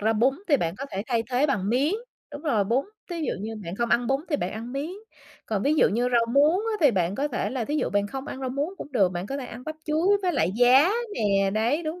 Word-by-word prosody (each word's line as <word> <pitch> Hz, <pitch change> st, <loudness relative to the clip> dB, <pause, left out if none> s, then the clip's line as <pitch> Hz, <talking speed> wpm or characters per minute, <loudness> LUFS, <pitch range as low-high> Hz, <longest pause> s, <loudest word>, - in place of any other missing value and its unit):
ra 220 Hz, +2 st, +2 dB
bún 250 Hz, +5 st, +2 dB
thì 285 Hz, -, +5 dB
bạn 170 Hz, -5 st, -2 dB
có 275 Hz, -, -4 dB
thể 195 Hz, 0 st, -3 dB
thay 235 Hz, -3 st, +1 dB
thế 255 Hz, +4 st, +3 dB
bằng 205 Hz, -8 st, -1 dB
miến, 275 Hz, -, +2 dB, 0.4 s
đúng 290 Hz, +2 st, -7 dB
rồi, 225 Hz, -10 st, +1 dB
bún, 240 Hz, +7 st, +1 dB, 0.3 s
thí 340 Hz, -, -3 dB
dụ 305 Hz, -, -1 dB
như 220 Hz, +2 st, -5 dB
bạn 170 Hz, +3 st, -5 dB
không 235 Hz, +1 st, 0 dB
ăn 240 Hz, 0 st, +3 dB
bún 270 Hz, +1 st, +1 dB
thì 295 Hz, -, +2 dB
bạn 180 Hz, -, -3 dB
ăn 230 Hz, +3 st, -6 dB
miến. 285 Hz, +4 st, -3 dB, 0.6 s
Còn 210 Hz, -2 st, -1 dB
ví 295 Hz, +2 st, +2 dB
dụ -, -, +4 dB
như 240 Hz, +4 st, 0 dB
rau 235 Hz, -1 st, +3 dB
muống 300 Hz, +6 st, +4 dB
á, 450 Hz, +1 st, -2 dB
thì 290 Hz, -, +6 dB
bạn 185 Hz, -3 st, 0 dB
có 285 Hz, +6 st, -1 dB
thể 245 Hz, -, -2 dB
là 255 Hz, -3 st, -2 dB
thí 295 Hz, -, -3 dB
dụ -, -, 0 dB
bạn 205 Hz, 0 st, +1 dB
không 265 Hz, +6 st, -6 dB
ăn 265 Hz, -, -6 dB
rau 260 Hz, -, -2 dB
muống 285 Hz, +6 st, -2 dB
cũng 285 Hz, -, -8 dB
được, 195 Hz, -7 st, +3 dB
bạn 175 Hz, +2 st, -4 dB
có 275 Hz, -, -4 dB
thể 255 Hz, -, -5 dB
ăn 245 Hz, -, -9 dB
bắp 310 Hz, -, -4 dB
chuối 340 Hz, +7 st, +2 dB
với 360 Hz, -1 st, +1 dB
lại 175 Hz, -, +1 dB
giá 260 Hz, +7 st, +6 dB, 0.2 s
nè, 195 Hz, -2 st, +2 dB
đấy, 230 Hz, -, +1 dB
đúng 320 Hz, +3 st, -4 dB
250 Hz, 285 wpm, -25 LUFS, 215-290 Hz, 0.6 s, thì